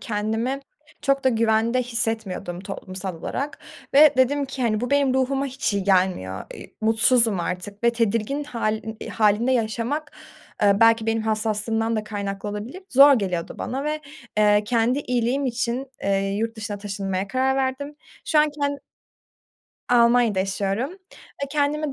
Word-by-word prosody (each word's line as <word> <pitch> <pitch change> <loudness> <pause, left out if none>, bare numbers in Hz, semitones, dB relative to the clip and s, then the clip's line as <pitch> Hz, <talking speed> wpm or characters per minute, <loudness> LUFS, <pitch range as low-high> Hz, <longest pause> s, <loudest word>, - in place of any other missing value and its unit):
kendimi 225 +5 -2 0.4
çok 275 -1 +1
da - - +6
güvende 230 +1 +2
hissetmiyordum 220 -7 -3
toplumsal 190 -2 -6
olarak 275 - -4 0.4
ve 295 +1 +7
dedim 280 +2 +2
ki, 270 -1 -5
hani, 215 -2 +1
bu 245 - -3
benim 280 -2 +3
ruhuma 270 +1 +1
hiç 265 -5 -2
iyi 200 - -1
gelmiyor, 180 - +1
eee, - - -12
mutsuzum 225 -2 +3
artık 185 +5 -5
ve 235 - +6
tedirgin 230 +5 0
hâlin 220 -4 -3
hâlinde 220 +3 +2
yaşamak, 245 +6 -1 0.5
eee, 200 0 +4
belki 225 0 +5
benim 225 0 0
hassaslığımdan 220 +1 -1
da 215 - -2
kaynaklı 200 -1 -4
olabilir, 215 - -6
zor 280 +2 +8
geliyordu 185 -7 -2
bana 270 +3 -3
ve, 305 +1 -2 0.4
eee, 210 0 +4
kendi 235 +4 +1
iyiliğim 250 +1 0
için, 245 +2 -2 0.2
eee, 195 0 0
yurt 225 +1 -2
dışına 210 -2 -5
taşınmaya 195 -1 -3
karar 265 +3 +1
verdim. 270 +2 -2 0.3
Şu 310 - +2
an 300 0 +4
ken 285 0 0 1.1
Almanya'da 235 -3 +4
yaşıyorum 195 +6 -1 0.2
ve 280 -1 -9
kendimi 295 0 0
230 Hz, 145 wpm, -23 LUFS, 205-265 Hz, 1.1 s, zor